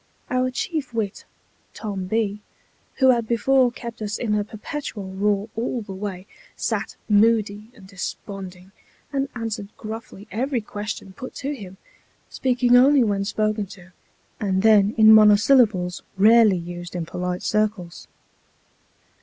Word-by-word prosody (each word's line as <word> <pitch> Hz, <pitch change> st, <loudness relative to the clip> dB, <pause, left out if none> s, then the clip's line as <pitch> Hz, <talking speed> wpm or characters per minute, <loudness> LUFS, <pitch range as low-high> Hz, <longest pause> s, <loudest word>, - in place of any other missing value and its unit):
Our 255 Hz, 0 st, +1 dB
chief 270 Hz, 0 st, -4 dB
wit, 210 Hz, -4 st, -3 dB, 0.5 s
Tom 200 Hz, -4 st, -4 dB
B, 210 Hz, 0 st, -1 dB, 0.5 s
who 260 Hz, -1 st, +5 dB
had 235 Hz, -2 st, 0 dB
before 245 Hz, +2 st, +3 dB
kept 235 Hz, -1 st, -9 dB
us 210 Hz, 0 st, -3 dB
in 225 Hz, -4 st, -1 dB
a 210 Hz, 0 st, +1 dB
perpetual 215 Hz, -2 st, -6 dB
roar 200 Hz, +1 st, 0 dB
all 235 Hz, +1 st, -2 dB
the 200 Hz, -2 st, -8 dB
way, 190 Hz, -1 st, -6 dB, 0.3 s
sat -, -, -2 dB
moody 215 Hz, 0 st, +2 dB
and 200 Hz, -6 st, -15 dB
desponding, 190 Hz, -1 st, -7 dB, 0.4 s
and 275 Hz, 0 st, -1 dB
answered 225 Hz, -3 st, -4 dB
gruffly 220 Hz, -2 st, -8 dB
every 250 Hz, +5 st, -1 dB
question 210 Hz, -2 st, -6 dB
put 255 Hz, +7 st, -9 dB
to 280 Hz, +2 st, -3 dB
him; 195 Hz, -8 st, -10 dB, 0.5 s
speaking 250 Hz, -1 st, +2 dB
only 265 Hz, +2 st, +6 dB
when 200 Hz, -3 st, 0 dB
spoken 215 Hz, 0 st, -1 dB
to, 180 Hz, -1 st, -14 dB, 0.5 s
and 190 Hz, -2 st, 0 dB
then 210 Hz, -1 st, +5 dB
in 220 Hz, 0 st, +8 dB
monosyllables 210 Hz, -3 st, +5 dB, 0.2 s
rarely 215 Hz, -1 st, +6 dB
used 175 Hz, +1 st, -7 dB
in 170 Hz, -2 st, -3 dB
polite 180 Hz, +1 st, -4 dB
circles. 210 Hz, -5 st, -2 dB
210 Hz, 135 wpm, -23 LUFS, 195-235 Hz, 0.5 s, in